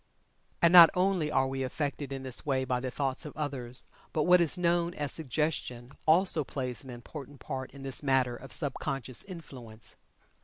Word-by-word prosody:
And 170 +1 +6
not 170 -2 +11
only 180 -4 +1
are 135 -3 +2
we 135 0 -3
affected 140 +1 -3
in 135 -1 -5
this 130 -2 -1
way 130 -2 0
by 125 -1 0
the 130 +1 -3
thoughts 135 +1 -1
of 150 -1 -9
others, 130 -5 -2 0.3
but 155 - +1
what 180 +1 +6
is 170 +2 +4
known 175 0 +1
as 145 -2 0
"Suggestion" 140 -4 -2 0.2
also 165 -1 +4
plays 130 -1 -5
an 135 - -12
important 135 +3 -9
part 130 +1 -5
in 140 -1 -12
this 135 -1 -2
matter 130 -3 +1
of 135 +1 -11
sub 145 -4 -1
conscious 135 -4 -2
influence. 125 - -10
135 Hz, 185 wpm, -30 LUFS, 130-160 Hz, 0.3 s, not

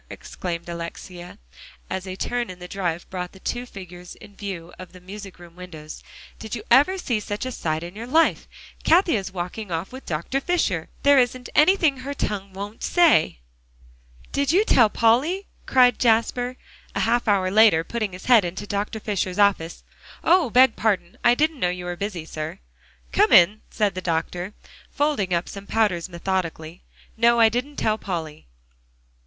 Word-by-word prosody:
exclaimed 170 -2 -6
Alexia, 175 +1 -8 0.5
as 190 0 -5
a 185 - -5
turn 240 +3 -2
in 185 - -8
the 180 0 -9
drive 175 -3 -3
brought 180 -1 -5
the 190 - -15
two 245 +5 -4
figures 180 -4 -10
in 205 -1 -15
view 180 -5 -7
of 185 0 -10
the 185 - -12
music 195 +1 -10
room 175 -1 -15
windows, 160 -4 -10 0.4
"did 220 +1 -5
you 220 - -7
ever 290 +10 +5
see 245 - -1
such 205 +3 -5
a 255 - -3
sight 160 -7 -3
in 175 +2 -9
your 230 +3 -7
life? 320 +6 +2 0.4
Cathie 345 -3 +4
is 190 -3 -3
walking 185 +3 -5
off 165 +3 -3
with 260 +1 -11
Dr. 170 - -2
Fisher! 210 - -1
There 280 -1 +6
isn't 250 0 0
anything 315 -3 +4
her 275 +2 -6
tongue 200 -6 -3
won't 200 +3 -8
say!" 310 - +3 0.9
"Did 280 +1 +1
you 395 +6 +3
tell 230 - +5
Polly?" 270 - +2 0.2
cried 250 -2 +4
Jasper, 245 +2 +1 0.4
a - - 0
half 235 +1 +1
hour 190 -3 +2
later, 210 -6 +5
putting 215 0 -3
his 180 - -10
head 240 -5 +6
into 185 +3 -5
Dr. 205 +2 -3
Fisher's 195 -3 -2
office. 200 -5 +1 0.4
"Oh! 345 -4 +4
beg 255 +1 +5
pardon; 190 -5 -1
I 240 - +5
didn't 310 +1 0
know 180 - +1
you 180 0 -5
were 175 0 -4
busy, 185 -4 -5
sir." 155 -1 -6 0.5
"Come - - +3
in," 195 +5 +6
said 210 -3 0
the 185 - -5
doctor, 175 +3 -3 0.3
folding 285 -10 0
up 170 0 0
some 200 0 -9
powders 190 -6 0
methodically. 170 -2 -4 0.4
"No, 235 +1 +4
I 225 -1 +7
didn't 250 +6 -3
tell 220 -4 0
Polly." 160 - -5
200 Hz, 175 wpm, -23 LUFS, 180-245 Hz, 0.9 s, I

